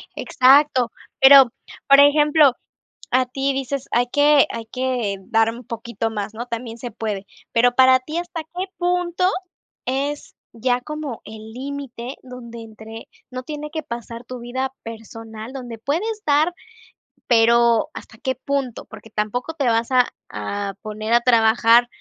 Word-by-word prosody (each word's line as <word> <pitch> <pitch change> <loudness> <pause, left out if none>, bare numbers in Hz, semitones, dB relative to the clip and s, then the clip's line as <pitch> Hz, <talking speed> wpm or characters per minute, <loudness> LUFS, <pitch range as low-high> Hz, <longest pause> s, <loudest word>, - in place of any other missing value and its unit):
Exacto. 260 -2 +4 0.3
Pero, 270 -2 +9 0.4
por 275 0 +7
ejemplo, 295 -1 +5 0.6
a 255 +1 +2
ti 270 +2 -1
dices: 270 0 -3
"Hay 245 +1 +2
que 290 0 +5
hay 230 -1 -6
que 250 -4 -2
dar 225 +2 +2
un 240 +2 -10
poquito 230 0 -4
más", 210 0 -5
¿no? 235 +2 -6
También 235 -1 -6
se 245 +1 -6
puede. 210 -3 -4 0.3
Pero 245 +1 +3
para 260 0 +6
ti, 305 +6 -5
¿hasta 345 -2 -5
qué 355 +4 -5
punto 355 0 +1 0.6
es 280 +3 -3 0.2
ya 245 +2 0
como 300 -4 -6
el 220 0 -10
límite 265 -1 -6
donde 240 -2 -10
entre, 220 0 -11 0.2
no 255 0 -6
tiene 300 +2 -6
que 315 0 -4
pasar 235 -3 -7
tu 250 +1 -8
vida 255 +2 -4
personal, 225 0 -9
donde 245 -4 -7
puedes 415 - -2
dar, 300 +4 +3 0.8
pero 235 -1 +4
hasta 220 - -11
qué 260 -2 -2
punto? 270 -2 -3
Porque 220 0 -13
tampoco 220 +8 -3
te 295 -4 -2
vas 230 +1 +1
a 250 -1 +4 0.2
a 195 - -4
poner 215 +1 -4
a 240 - +5
trabajar 230 0 +4
245 Hz, 150 wpm, -21 LUFS, 225-280 Hz, 0.8 s, Pero